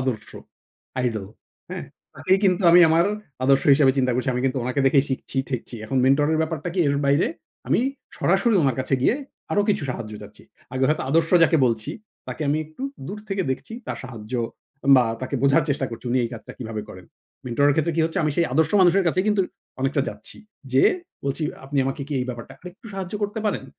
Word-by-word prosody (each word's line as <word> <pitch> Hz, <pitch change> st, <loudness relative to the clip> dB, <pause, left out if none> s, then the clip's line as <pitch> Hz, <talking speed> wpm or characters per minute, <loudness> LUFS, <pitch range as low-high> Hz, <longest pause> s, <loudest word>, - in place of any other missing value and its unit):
আদর্শ। 120 Hz, -5 st, -3 dB, 0.7 s
আইডল 110 Hz, -6 st, -2 dB, 0.4 s
হ্যাঁ? -, -, -5 dB, 0.3 s
তাকেই 190 Hz, +1 st, +2 dB
কিন্তু 185 Hz, 0 st, +3 dB
আমি 175 Hz, +1 st, +8 dB
আমার 165 Hz, +2 st, +4 dB, 0.4 s
আদর্শ 135 Hz, 0 st, +4 dB
হিসেবে 135 Hz, -2 st, +4 dB
চিন্তা 125 Hz, -1 st, +2 dB
করছি। 125 Hz, +2 st, -1 dB
আমি 125 Hz, -, -1 dB
কিন্তু 135 Hz, 0 st, -1 dB
উনাকে 130 Hz, +3 st, -1 dB
দেখেই 135 Hz, 0 st, +4 dB
শিখছি-ঠেকছি। 130 Hz, -2 st, -3 dB
এখন 130 Hz, -, -3 dB
মেন্টর 140 Hz, +3 st, +4 dB
এর 160 Hz, -, +1 dB
ব্যাপারটা 160 Hz, +1 st, -3 dB
কি 190 Hz, -, -3 dB
এর 140 Hz, -, +1 dB
বাইরে 140 Hz, +4 st, +3 dB, 0.4 s
আমি -, -, +3 dB, 0.4 s
সরাসরি 235 Hz, -3 st, +2 dB
উনার 135 Hz, -4 st, +1 dB
কাছে 130 Hz, +1 st, 0 dB
গিয়ে 215 Hz, -, +4 dB, 0.4 s
আরো 205 Hz, -, +3 dB
কিছু 205 Hz, 0 st, +1 dB
সাহায্য 110 Hz, -3 st, -6 dB
চাচ্ছি। 105 Hz, 0 st, -13 dB, 0.3 s
আগে 130 Hz, 0 st, +1 dB
হয়তো 155 Hz, -, +1 dB
আদর্শ 165 Hz, +2 st, +2 dB
যাকে 165 Hz, 0 st, +5 dB
বলছি 115 Hz, +3 st, -1 dB, 0.4 s
তাকে -, -, -4 dB
আমি 150 Hz, +2 st, +2 dB
একটু 155 Hz, -, -12 dB, 0.2 s
দূর 205 Hz, +2 st, -6 dB
থেকে 195 Hz, -1 st, -1 dB
দেখছি 130 Hz, -, -4 dB
তার -, -, -4 dB
সাহায্য 115 Hz, -3 st, -9 dB, 0.6 s
বা 125 Hz, -, +5 dB, 0.2 s
তাকে 130 Hz, +2 st, -4 dB
বোঝার 140 Hz, +3 st, +4 dB
চেষ্টা 140 Hz, -1 st, 0 dB
করছি। 115 Hz, -, -9 dB
উনি 130 Hz, -, +2 dB
এই -, -, -2 dB
কাজটা 115 Hz, -, -9 dB
কীভাবে 110 Hz, -3 st, -5 dB
করেন। 90 Hz, -1 st, -11 dB, 0.4 s
মেন্টরের 140 Hz, +4 st, +3 dB
ক্ষেত্রে 160 Hz, +2 st, +1 dB
কি -, -, +3 dB
হচ্ছে 160 Hz, -, -2 dB
আমি 155 Hz, -, +1 dB
সেই 170 Hz, -, +3 dB
আদর্শ 155 Hz, +3 st, +2 dB
মানুষের 185 Hz, +1 st, +5 dB
কাছেই 185 Hz, +3 st, +1 dB
কিন্তু 210 Hz, -2 st, +3 dB, 0.4 s
অনেকটা 135 Hz, +2 st, +1 dB
যাচ্ছি। -, -, -8 dB, 0.4 s
যে 130 Hz, -, +5 dB, 0.4 s
বলছি 140 Hz, +3 st, -2 dB, 0.2 s
আপনি 140 Hz, +1 st, -2 dB
আমাকে 135 Hz, +2 st, -3 dB
কি 150 Hz, -, -5 dB
এই -, -, -1 dB
ব্যাপারটা 120 Hz, -2 st, -7 dB
আরেকটু 180 Hz, +5 st, -12 dB
সাহায্য 190 Hz, 0 st, -5 dB
করতে 205 Hz, +2 st, -2 dB
পারেন? 210 Hz, -, -1 dB
140 Hz, 195 wpm, -23 LUFS, 130-165 Hz, 0.7 s, আমি